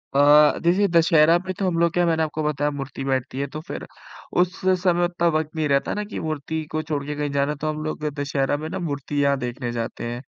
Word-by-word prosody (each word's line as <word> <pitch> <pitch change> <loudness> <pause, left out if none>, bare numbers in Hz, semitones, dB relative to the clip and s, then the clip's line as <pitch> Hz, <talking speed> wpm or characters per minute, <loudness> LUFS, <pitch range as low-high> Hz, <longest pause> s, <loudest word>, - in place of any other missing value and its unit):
अ, 145 +1 +6
देखिए 185 +4 +3
दशहरा 165 -1 +5
पे 185 +1 -5
तो 195 - +1
हम 170 -2 0
लोग 170 0 +3
क्या 175 - +2
है 175 - +2
मैंने 160 -1 +2
आपको 155 0 -3
बताया 150 -1 0
मूर्ति 135 -1 -6
बैठती 130 -1 -2
है 140 - 0
तो 155 - -4
फिर - - -6 0.6
उस 180 0 -1 0.2
समय 175 -1 +3
उतना 175 -1 0
वक़्त 155 0 -2
नहीं 155 -1 0
रहता 140 0 +1
ना 210 - -2
की 210 - -6
मूर्ति 155 0 -3
को 155 - -1
छोड़ 150 -2 -3
के 150 +1 -4
कहीं 145 -1 -2
जाना 140 +1 +1
है। 150 - -5
तो 155 +2 -2
हम 155 0 -3
लोग 155 0 -4 0.2
दशहरा 140 0 0
में 155 +2 -5
ना - - -4
मूर्तियाँ 140 -3 0
देखने 120 0 -4
जाते 115 -1 -4
हैं। 120 +1 -5
150 Hz, 245 wpm, -23 LUFS, 140-165 Hz, 0.6 s, अ